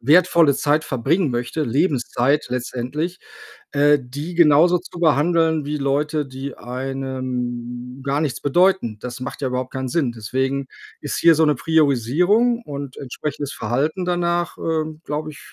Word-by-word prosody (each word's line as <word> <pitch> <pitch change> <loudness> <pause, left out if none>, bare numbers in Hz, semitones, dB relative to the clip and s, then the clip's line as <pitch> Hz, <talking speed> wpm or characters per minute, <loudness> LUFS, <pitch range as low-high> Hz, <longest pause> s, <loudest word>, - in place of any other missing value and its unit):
wertvolle 160 +1 +5
Zeit 150 +1 +1
verbringen 140 +5 0
möchte, 120 +6 -2
Lebenszeit 135 0 +1
letztendlich, 125 +7 -3 0.5
äh, 145 +1 +4
die 145 +8 -7
genauso 170 +2 +5
zu 175 -1 -11
behandeln 160 0 +3
wie 150 +1 -2
Leute, 145 +2 0
die 135 +1 -7
einem 125 -1 -5
gar 140 +1 0
nichts 145 -5 -2
bedeuten. 175 - +2
Das 125 +1 -7
macht 125 +2 -6
ja 130 - 0
überhaupt 125 +1 -3
keinen 130 -1 -3
Sinn. 135 -4 0
Deswegen 130 +4 -2 0.3
ist - - -3
hier 165 -2 +6
so 160 +1 +4
'ne 150 -2 +3
Priorisierung 160 - +2
und 140 - -7
entsprechendes 145 +1 -5
Verhalten 140 - -1
danach, 175 -1 0
ähm, 155 -1 -2
glaube 150 +1 -3
ich, 145 - -13
145 Hz, 145 wpm, -21 LUFS, 130-160 Hz, 0.5 s, hier